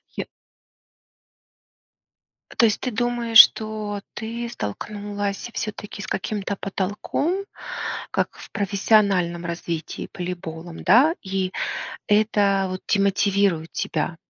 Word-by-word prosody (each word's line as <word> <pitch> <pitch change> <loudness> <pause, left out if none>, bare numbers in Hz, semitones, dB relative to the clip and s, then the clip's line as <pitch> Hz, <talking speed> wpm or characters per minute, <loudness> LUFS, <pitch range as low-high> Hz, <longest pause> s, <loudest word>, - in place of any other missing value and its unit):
Я - - -4 2.3
То 235 - +6
есть 215 - +2
ты 255 - -2
думаешь, 235 0 +3
что 215 -2 +5
ты 235 +1 -4
столкнулась 205 - -4
всё-таки 210 -1 -5
с - - -6
каким-то 200 0 -2
потолком, 205 - -2 0.7
как - - -1
в - - -12
профессиональном 195 -4 +2
развитии 170 -1 -4
волейболом 175 -2 -6
да 255 - +6
и 190 -1 -2 0.6
это, 205 -2 +3
вот, 185 0 -5
демотивирует 195 -4 +2
тебя? 160 +2 -2
200 Hz, 95 wpm, -23 LUFS, 185-215 Hz, 2.3 s, То